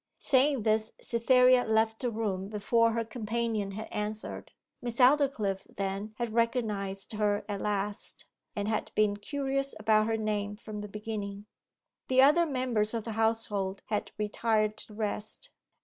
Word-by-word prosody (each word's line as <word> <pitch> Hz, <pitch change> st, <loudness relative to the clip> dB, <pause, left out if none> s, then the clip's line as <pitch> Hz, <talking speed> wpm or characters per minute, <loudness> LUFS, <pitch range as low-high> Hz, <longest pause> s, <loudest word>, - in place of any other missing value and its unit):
Saying 270 Hz, -2 st, +3 dB
this 220 Hz, 0 st, +1 dB
Cytherea 250 Hz, +1 st, +4 dB
left 220 Hz, 0 st, +2 dB
the 250 Hz, -, 0 dB
room 205 Hz, -4 st, -2 dB
before 225 Hz, +2 st, +2 dB
her 230 Hz, 0 st, -1 dB
companion 225 Hz, -2 st, -2 dB
had 215 Hz, +2 st, -6 dB
answered. 210 Hz, +1 st, -4 dB, 0.3 s
Miss 240 Hz, -1 st, -4 dB
Aldclyffe, 250 Hz, -8 st, +3 dB
then, 200 Hz, +2 st, -4 dB
had 235 Hz, -2 st, -3 dB
recognized 215 Hz, -5 st, -1 dB
her 210 Hz, -1 st, 0 dB
at 205 Hz, -2 st, -3 dB
last, 205 Hz, 0 st, -3 dB, 0.3 s
and 205 Hz, 0 st, -2 dB
had 215 Hz, -1 st, -1 dB
been 210 Hz, -1 st, +3 dB
curious 275 Hz, +4 st, -2 dB
about 215 Hz, 0 st, +3 dB
her 225 Hz, 0 st, +1 dB
name 210 Hz, -1 st, -2 dB
from 210 Hz, -1 st, -7 dB
the 210 Hz, -, -6 dB
beginning. 205 Hz, -1 st, -5 dB, 0.6 s
The 260 Hz, 0 st, +5 dB
other 330 Hz, +5 st, +5 dB
members 245 Hz, -6 st, 0 dB
of 225 Hz, -, -2 dB
the 225 Hz, -, -5 dB
household 215 Hz, -3 st, 0 dB
had 210 Hz, -1 st, -1 dB
retired 215 Hz, 0 st, +1 dB
to 215 Hz, -, -10 dB
rest. 215 Hz, -, -4 dB
220 Hz, 150 wpm, -30 LUFS, 210-235 Hz, 0.6 s, The